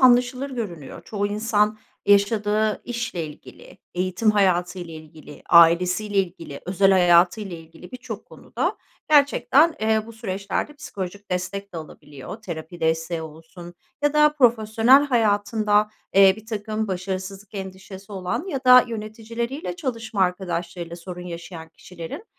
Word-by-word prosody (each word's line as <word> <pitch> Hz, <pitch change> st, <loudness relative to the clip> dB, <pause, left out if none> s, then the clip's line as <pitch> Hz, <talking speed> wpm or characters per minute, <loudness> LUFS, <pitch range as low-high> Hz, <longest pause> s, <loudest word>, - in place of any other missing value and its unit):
anlaşılır 250 Hz, +2 st, +4 dB
görünüyor. 185 Hz, -, -6 dB
Çoğu 205 Hz, -1 st, -2 dB
insan 210 Hz, 0 st, +1 dB, 0.3 s
yaşadığı 210 Hz, +1 st, +2 dB
işle 225 Hz, -9 st, -3 dB
ilgili, 150 Hz, +5 st, -14 dB, 0.2 s
eğitim 185 Hz, +4 st, +1 dB
hayatıyla 180 Hz, -4 st, 0 dB
ilgili, 155 Hz, -1 st, -13 dB
ailesiyle 180 Hz, +5 st, +5 dB
ilgili, 170 Hz, -6 st, -3 dB
özel 195 Hz, +1 st, +3 dB
hayatıyla 180 Hz, +1 st, +3 dB
ilgili 165 Hz, +2 st, -14 dB
birçok 255 Hz, 0 st, -7 dB
konuda -, -, -4 dB, 0.3 s
gerçekten, 295 Hz, +2 st, +4 dB
eee, 220 Hz, 0 st, +2 dB
bu 230 Hz, -, -10 dB
süreçlerde 200 Hz, +5 st, -4 dB
psikolojik 200 Hz, -8 st, -7 dB
destek 185 Hz, +2 st, -3 dB
de -, -, -7 dB
alabiliyor. 150 Hz, -1 st, -9 dB
Terapi 170 Hz, -1 st, -7 dB
desteği 160 Hz, +1 st, -1 dB
olsun 165 Hz, +3 st, -11 dB, 0.3 s
ya 290 Hz, 0 st, +2 dB
da 300 Hz, 0 st, +5 dB
profesyonel 240 Hz, +1 st, +4 dB
hayatında, 210 Hz, -3 st, +2 dB, 0.2 s
eee, 195 Hz, -1 st, +7 dB
birtakım 215 Hz, -1 st, -4 dB
başarısızlık 190 Hz, +2 st, -5 dB
endişesi 190 Hz, +1 st, -8 dB
olan 190 Hz, -, -3 dB
ya 280 Hz, -9 st, -3 dB
da 250 Hz, 0 st, +8 dB
yöneticileriyle 230 Hz, +8 st, -5 dB
çalışma 230 Hz, -, -4 dB
arkadaşlarıyla 175 Hz, -2 st, -3 dB
sorun 180 Hz, +1 st, -8 dB
yaşayan 170 Hz, -1 st, -8 dB
kişilerin, 170 Hz, -, -9 dB
200 Hz, 120 wpm, -23 LUFS, 175-225 Hz, 0.3 s, da